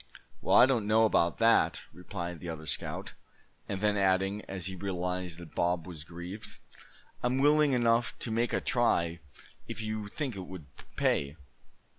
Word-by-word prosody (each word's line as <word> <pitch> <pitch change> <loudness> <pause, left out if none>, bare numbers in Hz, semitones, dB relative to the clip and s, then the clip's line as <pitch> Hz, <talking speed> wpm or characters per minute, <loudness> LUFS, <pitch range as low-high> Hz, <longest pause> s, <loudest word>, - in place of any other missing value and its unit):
"Well, - - +2
I - - +10
don't 120 -6 +1
know 110 +1 +5
about 85 -5 +2
that," 115 0 +4
replied 85 -1 -6
the 85 - -6
other 80 -1 -6
scout; - - -3 0.6
and 100 -1 -3
then 105 -1 +2
adding, 95 +1 +2
as 95 -3 -5
he 95 0 -3
realized 90 -2 -3
that 85 -3 -11
Bob 85 -1 0
was 85 -5 -8
grieved: 90 +6 -8 0.6
"I'm 125 +1 +1
willing 150 +1 +4
enough 120 -1 +2
to 115 - -3
make 115 +2 +1
a - - 0
try, 85 -9 +1 0.5
if - - -6
you 110 -1 -3
think 130 +1 -4
it 95 -2 -7
would 90 -5 -9 0.3
pay. 70 +2 +1
95 Hz, 165 wpm, -30 LUFS, 85-115 Hz, 0.6 s, I